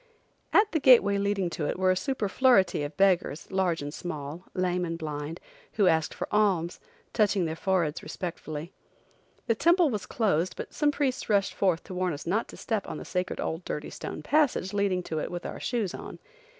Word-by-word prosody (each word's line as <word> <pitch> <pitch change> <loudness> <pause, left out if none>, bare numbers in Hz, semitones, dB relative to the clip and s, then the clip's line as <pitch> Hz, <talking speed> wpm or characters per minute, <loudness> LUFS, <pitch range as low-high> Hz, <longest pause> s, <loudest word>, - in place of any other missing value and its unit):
At 420 0 +4
the 320 - +1
gateway 215 -7 +6
leading 200 -2 0
to 150 -3 -2
it - - -2
were 185 0 +3
a - - +2
superfluity 230 - +2
of 145 0 -5
beggars, 185 -4 +2
large 185 -5 +1
and 145 0 -5
small, 155 0 -6
lame 180 -1 0
and 165 -1 -3
blind, 150 0 -5 0.3
who 205 - +3
asked 160 -3 +3
for - - -4
alms, 190 -5 +2 0.3
touching 205 -4 +2
their 160 0 -2
foreheads 170 -4 0
respectfully. 165 -2 -6 0.7
The 230 - +3
temple 340 - +4
was 205 -5 -3
closed 185 -6 0
but - - -7
some 295 - +2
priests 280 -5 -1
rushed 200 -2 +2
forth 185 -4 +1
to - - -9
warn 180 -1 0
us 145 - -7
not 205 +7 0
step 220 -4 -2
on - - -5
the - - -8
sacred 180 0 -2
old 165 +3 -3
dirty 150 - -5
stone 155 - -6
passage 280 - +2
leading 200 -3 +1
to 160 -2 -3
it - - -3
with 175 -1 -6
our - - -5
shoes 220 -7 -1
on. - - -8
185 Hz, 190 wpm, -28 LUFS, 165-210 Hz, 0.7 s, gateway